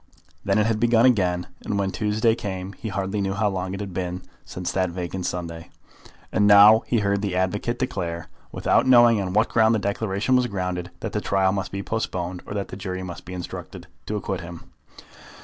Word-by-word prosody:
Then 100 0 +1
it 105 - +3
had 110 -1 0
begun 120 0 +4
again, 90 -8 +2 0.2
and 105 - -2
when 100 -1 0
the 95 - -6
Tuesday 110 +2 +2
came 95 -3 -5
he 110 - -8
hardly 95 +1 -2
knew 95 0 -1
how 105 +1 +1
long 95 0 -3
it - - -6
had 100 -3 -6
been 90 0 -4 0.2
since 90 -1 -5
that 95 -1 0
vacant 90 +1 -4
Sunday. 85 -2 -5 0.6
And 105 - +3
now 105 +2 +8
he 115 -3 +1
heard 100 0 +1
the 100 -3 -2
advocate 105 +6 -1
declare, 85 -9 -3 0.2
without - - +2
knowing 120 -4 +6
on 90 -1 -3
what 110 +2 +3
ground 110 0 +4
the - - +1
declaration 100 +4 0
was 125 -1 +3
grounded, 90 -4 -3
that - - -4
the - - -1
trial 95 -1 +2
must 95 -1 -3
be 100 0 -4
postponed, 90 -5 -3
or 105 - -5
that 100 -1 -3
the - - -7
jury 95 -1 -5
must 90 -2 -8
be 90 - -7
instructed 90 - -7 0.2
to 105 - -2
acquit 95 -3 -3
him. 85 -1 -10
100 Hz, 210 wpm, -24 LUFS, 90-105 Hz, 0.6 s, now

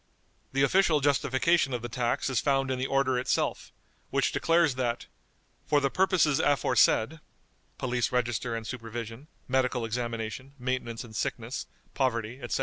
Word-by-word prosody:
The 135 +1 +2
official 165 +1 +4
justification 140 +1 +2
of 120 - -5
the - - -2
tax 120 0 -1
is 130 -4 +1
found 135 +1 +1
in 130 - -1
the 130 - -1
order 135 -2 +2
itself, 125 - -1 0.4
which - - +1
declares 165 -3 +3
that, 120 -2 -2 0.6
"for 145 - +4
the 140 -1 0
purposes 185 -6 +3
aforesaid" 135 0 +3 0.6
(police 120 -2 -1
register 120 -1 -1
and 115 -1 -5
supervision, 115 +2 -6 0.2
medical 130 -2 +1
examination, 115 +2 -4
maintenance 125 -2 -3
in 115 -2 -12
sickness, 115 +4 -3 0.3
poverty, 120 -2 -1
etc.) 120 - -2
130 Hz, 145 wpm, -28 LUFS, 120-140 Hz, 0.6 s, official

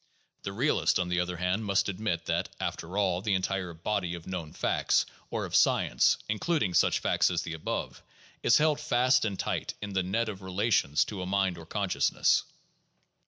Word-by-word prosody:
The 95 - -4
realist, 130 +10 +2
on 90 -1 -1
the 90 0 +1
other 90 0 -2
hand, 90 +5 -1
must 100 -2 +1
admit 90 -4 -2
that, - - -1
after 90 +4 -4
all, 95 -3 +1
the 100 -1 +1
entire 95 -1 -2
body 90 +1 -2
of 85 - -10
known 90 -5 -5
facts, - - +1 0.2
or - - -2
of - - -4
science, - - +3
including 110 - 0
such - - +4
facts - - +2
as 85 -3 -1
the 80 - -5
above, 80 - -4 0.4
is - - +5
held 150 -1 +2
fast 125 -4 +2
and 100 -3 -2
tight - - -3
in 105 -1 -6
the 95 - +2
net 105 +6 -1
of 100 -3 -6
relation 95 -5 0
to 95 +4 +1
a 90 - -4
mind 95 -1 +1
or 80 - -12
consciousness. 100 0 +2
95 Hz, 185 wpm, -29 LUFS, 90-105 Hz, 0.4 s, is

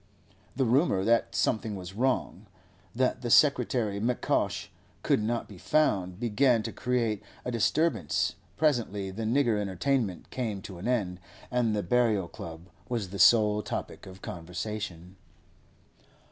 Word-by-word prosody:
The 130 +1 +1
rumour 120 - +3
that 115 +1 +2
something 110 -2 0
was 95 -1 -7
wrong, 115 -3 -1 0.5
that 130 +1 +1
the 120 - -3
secretary 120 -6 +3
M'Cosh 120 +3 0 0.3
could - - +2
not 115 +2 -1
be 100 -4 -12
found, 95 -12 +1
began 120 0 +2
to - - -4
create 115 -3 -1 0.2
a 125 - -2
disturbance; 115 - +1 0.2
presently 110 -10 0
the 110 +4 -4
nigger 120 -2 +2
entertainment 100 +1 -1
came 110 -6 -3
to 95 -3 -8
an 95 - -5
end, 100 -8 0 0.3
and 120 -3 +1
the 105 - -1
Burial 110 -2 +2
Club 80 +1 -9 0.2
was 115 -6 -2
the 100 +1 -7
sole 105 -2 +6
topic - - -6
of 95 0 -12
conversation. 90 +1 -6
110 Hz, 135 wpm, -28 LUFS, 95-125 Hz, 0.5 s, sole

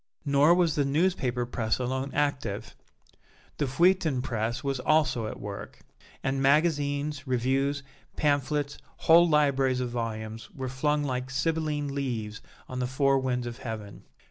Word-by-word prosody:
Nor 145 +4 +5
was 175 -3 +3
the 145 - +1
newspaper 140 -5 +1
press 110 -2 -1
alone 130 +2 -2
active. 145 -2 -1 0.8
The 145 - +1
feuilleton 160 -2 +2
press 115 +2 -2
was 135 -2 -1
also 130 -5 +2
at - - -7
work; 100 0 -8 0.4
and 135 0 0
magazines, 145 -1 +1
reviews, 135 +3 0 0.3
pamphlets, 145 0 0 0.3
whole 170 +1 +7
libraries 135 -4 +3
of 125 -1 -2
volumes, 110 -1 -4
were 130 -2 -4
flung 150 +3 0
like 130 -2 -2
Sibylline 145 +1 -1
leaves 115 -6 -3 0.3
on 130 - -5
the 125 - 0
four 135 +1 +2
winds 125 -2 -1
of 120 +1 -6
heaven. 110 -4 -7
135 Hz, 140 wpm, -28 LUFS, 125-145 Hz, 0.8 s, whole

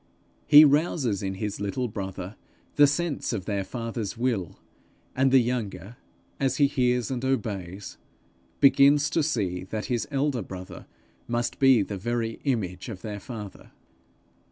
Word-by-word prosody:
He 150 0 +10
rouses 145 - +1
in 95 -1 -3
his 105 +1 -4
little 100 +5 -2
brother 95 -2 -6 0.4
the 145 - +7
sense 145 -2 -1
of 95 -5 -4
their 100 -2 -1
father's 115 -1 -5
will; 115 -8 -2 0.6
and 135 +1 +3
the 135 - +7
younger, 115 -5 -2 0.4
as 135 -1 0
he 145 - +5
hears 125 -3 0
and 125 -1 -3
obeys, 100 -8 -3 0.6
begins 140 +2 +5
to 165 - +2
see 100 - -1
that 105 +2 -4
his 120 - -1
elder 140 -3 0
brother 95 -1 -9 0.4
must 120 0 -2
be 130 -6 +5
the 100 -1 -6
very 115 +1 -2
image 100 -8 -2
of 95 -5 -8
their 105 -2 -5
father. 105 -3 -9
115 Hz, 145 wpm, -26 LUFS, 100-135 Hz, 0.6 s, He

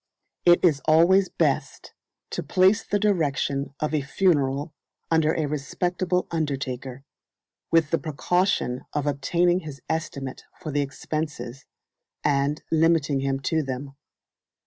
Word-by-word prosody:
It 175 +1 +6
is 150 -5 +3
always 175 +5 +5
best - - -1 0.4
to - - -2
place 190 +4 +3
the 205 - 0
direction 145 -8 0
of 150 0 -2
a 150 - +2
funeral 145 -1 +1 0.4
under 160 -1 +3
a 160 - 0
respectable 175 +5 -1
undertaker, 135 -4 -3 0.7
with 165 -3 +3
the 165 - +2
precaution 160 -4 0
of 145 -1 -1
obtaining 170 +6 +2
his 150 -5 -9
estimate 140 -4 -4 0.2
for 155 - -5
the 145 0 +1
expenses, 135 -2 -5 0.6
and 145 +1 +1
limiting 160 -3 +3
him 135 0 -1
to 160 +4 +1
them. 135 0 -5
150 Hz, 125 wpm, -25 LUFS, 140-170 Hz, 0.7 s, It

